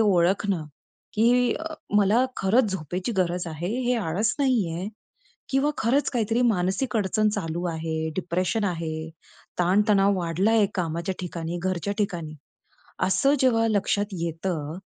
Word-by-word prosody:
ओळखणं, 190 -3 +2 0.5
की 240 +2 +3 0.4
मला 210 +5 +4
खरंच 210 +3 +3
झोपेची 180 +5 -3
गरज 180 -1 0
आहे, 165 +2 -4 0.2
हे 250 - +3
आळस 210 +2 0
नाहीये 205 - +1 0.6
किंवा 270 +2 +2
खरंच 260 +6 +2
काहीतरी 230 -1 0
मानसिक 215 +2 +1
अडचण 215 +2 +2
चालू 165 -3 -3
आहे, 160 0 -2
डिप्रेशन 185 +4 -1
आहे, 160 -3 -3 0.5
ताणतणाव 200 +2 +3
वाढलाय 195 +6 +2
कामाच्या 170 0 -2
ठिकाणी, 170 -1 -4
घरच्या 185 +2 -1
ठिकाणी, 170 -7 -2 0.7
असं 270 +10 +3
जेव्हा 230 -3 +3
लक्षात 205 -1 +1 0.2
येतं 165 -2 -3
190 Hz, 115 wpm, -25 LUFS, 170-220 Hz, 0.7 s, मला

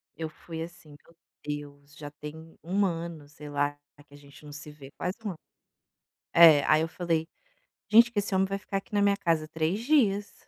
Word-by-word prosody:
eu 160 -1 -5
fui 160 +1 -9
assim, 165 -2 -9
meu 155 +3 -18 0.3
Deus, 145 0 -7
já 145 -2 -9
tem 155 +2 -11
1 195 +4 +1
ano 165 -4 -4
sei 150 0 -11
lá, 145 0 -1 0.3
que - - -21
a 145 - -13
gente 145 +1 -17
não 145 - -10
se 150 +1 -9
vê, 140 -2 -13
quase 180 +2 -3
1 205 - -1
ano. 165 - -10 1.0
É, 160 -4 +8
aí 155 - +4
eu 165 - -2
falei: 165 -1 -1 0.6
"Gente 230 +3 +7
que 220 - 0
esse 205 0 -3
homem 190 0 +2
vai 195 +1 -2
ficar 195 0 -4
aqui 195 +2 -8
na 205 - +2
minha 200 0 +3
casa 165 -5 0
3 160 +6 -1
dias". 225 -8 +2
160 Hz, 205 wpm, -28 LUFS, 150-195 Hz, 1.0 s, É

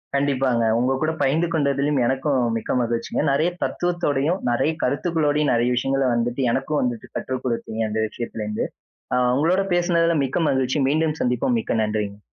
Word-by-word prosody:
கண்டிப்பாங்க. 135 -4 +1 0.2
உங்க 125 +2 +1
கூட 155 0 +1
பகிர்ந்து 150 +5 +2
கொண்டதிலும் 140 -1 +1
எனக்கும் 135 +2 +1 0.2
மிக்க 110 - -4
மகிழ்ச்சிங்க. 115 -1 -1
நெறைய 155 +5 +2
தத்துவத்தோடையும், 175 -1 0
நெறைய 135 +6 +1
கருத்துக்களோடையும், 150 +1 +1
நெறைய 120 +1 +2
விஷயங்கள்ல 135 +1 +1
வந்துட்டு 120 +3 -1
எனக்கும் 140 +3 0
வந்துட்டு 120 -3 -2
கற்று 130 - -3
கொடுத்தீங்க. 115 -2 -3
அந்த 110 +1 -1
விஷயத்தில 110 -1 -5
இருந்து 105 0 -2 0.5
அ - - +3 0.2
உங்களோடு 170 +8 +2
பேசியதில் 170 -3 +2
மிக்க 135 - -2
மகிழ்ச்சி. 130 +1 0
மீண்டும் 155 +1 +1
சந்திப்போம். 125 0 +1
மிக்க - - -2
நன்றி. 105 -1 -3
135 Hz, 150 wpm, -22 LUFS, 120-155 Hz, 0.5 s, அ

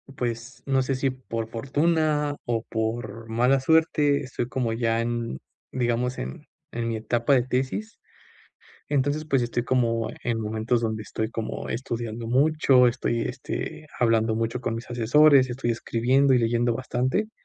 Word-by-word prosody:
pues, 120 0 -4
no 135 -1 +2
sé, 130 +1 -1
si 135 +1 0
por 115 -3 -5
fortuna, 150 +4 +1
o 115 -2 -1
por 115 0 -4
mala 125 +4 +3
suerte, 150 -1 +3
estoy 125 -3 -4
como 125 -3 -1
ya 115 0 +1
en, 115 - -3 0.3
digamos, 125 0 0
en 65 +2 -6 0.3
en 115 0 -2
mi 115 - -1
etapa 120 +4 +1
de 125 -3 +4
tesis. 130 - -3 0.9
Entonces, 145 +2 +1
pues, 135 -4 +2
estoy 120 0 -1
como 115 -3 +1
en 115 -2 -1
momentos 110 +2 0
donde 110 -1 -2
estoy 110 0 -3
como 115 -1 -5
estudiando 115 -1 -4
mucho, 135 0 +4
estoy, 120 -1 -1
este, 130 +5 -5
hablando 115 -2 +2
mucho 115 +2 -1
con 115 -2 -2
mis 115 +2 -7
asesores, 130 +3 +5
estoy 120 -1 -1
escribiendo 130 +4 +2
y 125 - +4
leyendo 120 +1 +1
bastante. 130 - -1
120 Hz, 150 wpm, -25 LUFS, 115-135 Hz, 0.9 s, asesores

